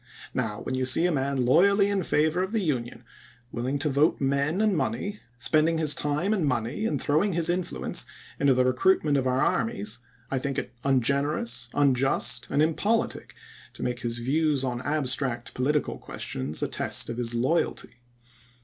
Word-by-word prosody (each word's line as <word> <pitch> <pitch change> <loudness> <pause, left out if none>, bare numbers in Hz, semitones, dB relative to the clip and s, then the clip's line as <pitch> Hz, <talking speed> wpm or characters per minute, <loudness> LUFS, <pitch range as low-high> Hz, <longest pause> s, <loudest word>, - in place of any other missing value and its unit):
Now, 110 -4 -2
when - - -4
you 130 0 0
see 145 +6 +4
a 180 - +2
man 135 -3 0
loyally 195 +9 +4
in 200 -1 0
favor 160 +1 +1
of 190 +1 -2
the 225 - +1
Union 130 - -3 0.2
— 125 0 -29
willing 130 +4 -2
to 145 +2 -1
vote 145 +4 +2
men 140 +5 0
and 215 -2 +2
money 140 - -2
— 125 - -36
spending 155 +5 +2
his 155 -2 +4
time 150 +8 0
and 195 -6 0
money 130 - -1
and 145 - -1
throwing 160 +10 +1
his 170 0 +1
influence 180 0 -1 0.4
into 140 -2 +4
the 130 0 +3
recruitment 145 +3 +2
of 130 -2 +1
our 130 +1 +1
armies, 110 -1 0 0.3
I 135 - 0
think 140 0 -3
it 125 - -4
ungener 140 +2 +1
ous, 175 - -5
unjust, 135 -2 +1
and 150 - +2
impolitic 205 +8 -1 0.4
to - - -7
make 125 0 -2
his 120 -1 -2
views 140 +3 +1
on 125 -1 -2
abstract 130 -4 -1
political 145 +4 -1
questions 70 +4 -3
a - - +1
test - - 0
of 115 - -5
his 120 -1 -2
loyalty. 125 -1 -1
140 Hz, 180 wpm, -26 LUFS, 125-160 Hz, 0.4 s, see